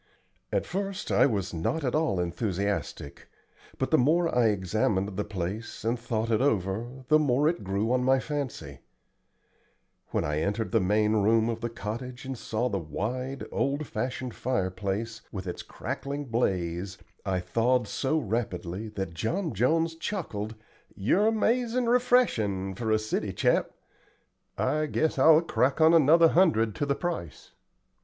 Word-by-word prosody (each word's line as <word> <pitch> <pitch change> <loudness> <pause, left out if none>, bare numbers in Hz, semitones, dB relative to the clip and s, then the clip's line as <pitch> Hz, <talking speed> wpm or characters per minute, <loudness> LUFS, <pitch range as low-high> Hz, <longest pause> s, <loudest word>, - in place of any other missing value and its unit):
At - - 0
first 195 +1 -4
I - - +5
was 100 -7 -2
not 85 - -1
at 125 - 0
all 135 - +1
enthusiastic, 90 -3 -3 0.5
but - - -2
the - - +5
more 165 +5 +2
I 120 -2 +4
examined 100 0 0
the 105 - -1
place, 105 +3 -5
and 115 +1 0
thought 115 -1 -2
it 110 - +2
over, 120 +2 -1
the 155 0 +6
more 145 0 +2
it 170 +2 0
grew 100 +4 -1
on 125 0 +2
my 130 +1 +4
fancy. 130 - -5 1.3
When - - -1
I 75 +1 -1
entered 105 +6 -1
the 115 - +4
main 105 +3 +2
room 110 +2 +3
of 115 -1 -3
the 120 - -2
cottage, 120 +3 -6
and 135 0 -4
saw 115 0 -2
the 100 -5 -1
wide, 125 - -4
old 140 +2 -1
fashioned 125 -2 -4
fireplace, 105 -1 -2
with 95 -2 -6
its 90 - -5
crackling 140 +1 -5
blaze, 95 -6 -1 0.3
I 95 -2 0
thawed 120 +5 +1
so 135 +9 0
rapidly 105 - -3
that 95 -4 -3
John 160 - -2
Jones 160 - +2
chuckled. 130 - -4 0.4
"You're 180 - +2
amazin' 235 +2 +1
refreshin' 230 - +2
for 110 +4 -3
a 110 - +4
city 110 0 -2
chap. - - +2 0.9
I 155 0 +1
guess 155 -1 0
I'll 160 +3 +7
crack 135 -4 +1
on 160 +1 +6
another 165 +1 +6
hundred 145 - +3
to 145 - -1
the 140 - +1
price." 165 - -5
115 Hz, 150 wpm, -28 LUFS, 100-145 Hz, 1.3 s, I'll